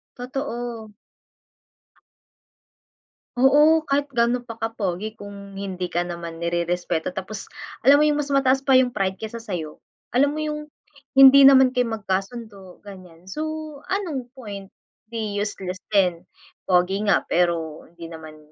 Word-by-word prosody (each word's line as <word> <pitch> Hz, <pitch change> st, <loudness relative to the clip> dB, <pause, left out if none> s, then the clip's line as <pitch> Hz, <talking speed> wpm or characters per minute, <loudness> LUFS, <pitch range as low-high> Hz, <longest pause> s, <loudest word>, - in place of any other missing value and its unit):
Totoo. 240 Hz, -4 st, -5 dB, 2.5 s
Oo. 300 Hz, +5 st, +5 dB
Kahit 285 Hz, +1 st, 0 dB
gaano 240 Hz, -1 st, +1 dB
pa 230 Hz, -2 st, -10 dB
ka-pogi 215 Hz, -2 st, -3 dB
kung, 200 Hz, -2 st, -11 dB
hindi 190 Hz, -2 st, -4 dB
ka 175 Hz, -, 0 dB
naman 170 Hz, -1 st, -6 dB
nirerespeto. 170 Hz, 0 st, -1 dB
Tapos 195 Hz, +2 st, -6 dB, 0.4 s
alam 285 Hz, +2 st, +7 dB
mo -, -, +5 dB
'yong 295 Hz, 0 st, +2 dB
mas 285 Hz, -1 st, -3 dB
mataas 270 Hz, 0 st, +2 dB
pa 270 Hz, -, +4 dB
'yung 255 Hz, -1 st, +5 dB
pride 195 Hz, -4 st, -2 dB
kaysa 220 Hz, +1 st, -5 dB
sa'yo. 180 Hz, -9 st, -6 dB, 0.3 s
Alam 280 Hz, +4 st, +2 dB
mo, 310 Hz, -, -4 dB
yung 300 Hz, 0 st, -3 dB, 0.5 s
hindi 270 Hz, 0 st, +9 dB
naman 265 Hz, -1 st, +7 dB
kayo 250 Hz, -1 st, 0 dB
magkasundo, 195 Hz, -1 st, -5 dB
ganyan. 185 Hz, -3 st, -13 dB
So, 305 Hz, +10 st, -4 dB, 0.4 s
anong 295 Hz, -11 st, -3 dB
point? 200 Hz, -6 st, -9 dB, 0.3 s
Di 215 Hz, -3 st, -4 dB
useless 195 Hz, -3 st, -4 dB, 0.2 s
din. 180 Hz, -3 st, +2 dB, 0.4 s
Pogi 190 Hz, +3 st, +2 dB
nga 200 Hz, -, +3 dB
pero 170 Hz, -3 st, 0 dB
hindi 170 Hz, 0 st, -11 dB
naman 160 Hz, -1 st, -10 dB
210 Hz, 135 wpm, -23 LUFS, 180-260 Hz, 2.5 s, hindi